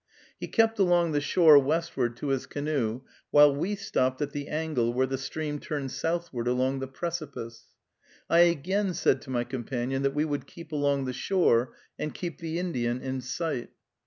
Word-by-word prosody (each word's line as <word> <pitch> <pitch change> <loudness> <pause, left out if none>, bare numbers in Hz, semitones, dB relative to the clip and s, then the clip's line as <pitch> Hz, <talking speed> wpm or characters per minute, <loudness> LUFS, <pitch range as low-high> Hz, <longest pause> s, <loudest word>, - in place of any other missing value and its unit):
He - - -5
kept 225 -1 +2
along 175 -3 +3
the 145 -1 +1
shore 155 -1 +7
westward 140 -5 -1
to 145 - -4
his 135 -2 -1
canoe, 140 -6 -2 0.3
while 145 -1 +6
we 190 +8 -1
stopped 130 -10 0
at 145 -1 -2
the 145 0 -5
angle 150 -7 0
where 130 +2 +2
the 135 0 -2
stream 150 +1 -4
turned 140 -4 -4
southward 165 -8 -2
around 130 +2 +1
the 135 - -4
precipice. 135 -6 -6 0.6
I 170 - +4
again 180 +3 +2
said - - +2
to - - -13
my 120 -2 0
companion 130 +1 -3
that 140 0 0
we 150 +1 +2
would 145 -2 -3
keep 170 -2 -12
along 140 -2 +1
the 130 - -3
shore 125 -6 +2 0.2
and 150 - -4
keep 175 -3 -5
the 165 0 -3
Indian 125 -9 -1
in 130 0 -4
sight. 130 0 -3
145 Hz, 180 wpm, -28 LUFS, 130-165 Hz, 0.6 s, shore